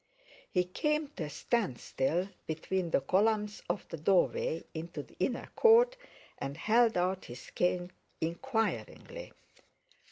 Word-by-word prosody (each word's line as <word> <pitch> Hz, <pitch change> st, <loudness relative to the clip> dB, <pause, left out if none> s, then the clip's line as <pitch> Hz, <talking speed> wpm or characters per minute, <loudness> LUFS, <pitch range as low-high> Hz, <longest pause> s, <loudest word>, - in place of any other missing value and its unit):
He 180 Hz, -3 st, +2 dB
came 300 Hz, -, 0 dB
to 170 Hz, -, -5 dB
a -, -, -6 dB
standstill 175 Hz, -, -1 dB, 0.2 s
between 170 Hz, +3 st, -1 dB
the 150 Hz, -, +2 dB
columns 210 Hz, +6 st, +1 dB
of -, -, -2 dB
the -, -, -5 dB
doorway 165 Hz, -1 st, +2 dB
into 160 Hz, -2 st, -5 dB
the -, -, -20 dB
inner 245 Hz, +6 st, -1 dB
court, 475 Hz, +2 st, +6 dB, 0.4 s
and 140 Hz, +1 st, -4 dB
held 225 Hz, +3 st, +4 dB
out 185 Hz, +1 st, 0 dB
his 120 Hz, +1 st, -10 dB
cane 180 Hz, 0 st, 0 dB, 0.3 s
inquiringly. 225 Hz, -, -2 dB
185 Hz, 125 wpm, -32 LUFS, 165-230 Hz, 0.4 s, court